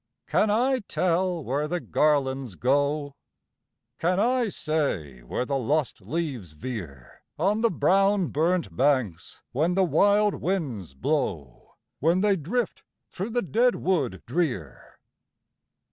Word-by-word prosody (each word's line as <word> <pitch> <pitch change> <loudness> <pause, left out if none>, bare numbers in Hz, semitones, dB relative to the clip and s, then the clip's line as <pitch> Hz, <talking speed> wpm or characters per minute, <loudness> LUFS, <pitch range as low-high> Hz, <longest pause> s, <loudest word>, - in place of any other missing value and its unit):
can 215 - +2
I 255 +5 +2
tell 180 -1 0
where 140 +4 -1
the 175 +2 -1
garlands 135 - +1
go? 145 - +1 0.9
Can 180 +3 +1
I 240 +1 +2
say 120 - -2
where - - -3
the 140 +1 -1
lost 140 -2 -1
leaves 125 - -4
veer 75 - -8 0.2
On 200 +7 +1
the 230 - +4
brown 195 +3 +2
burnt 170 +4 0
banks, 130 - 0
when 160 +8 +1
the 190 - +4
wild 205 +3 +3
winds 135 - -3
blow, 75 - -3 0.2
When 170 +5 +2
they 205 -1 +3
drift 195 - -2 0.3
through 195 +5 -4
the 245 +1 0
dead 235 - +2
wood 140 - -1
drear? 120 - -3
155 Hz, 125 wpm, -26 LUFS, 125-190 Hz, 0.9 s, the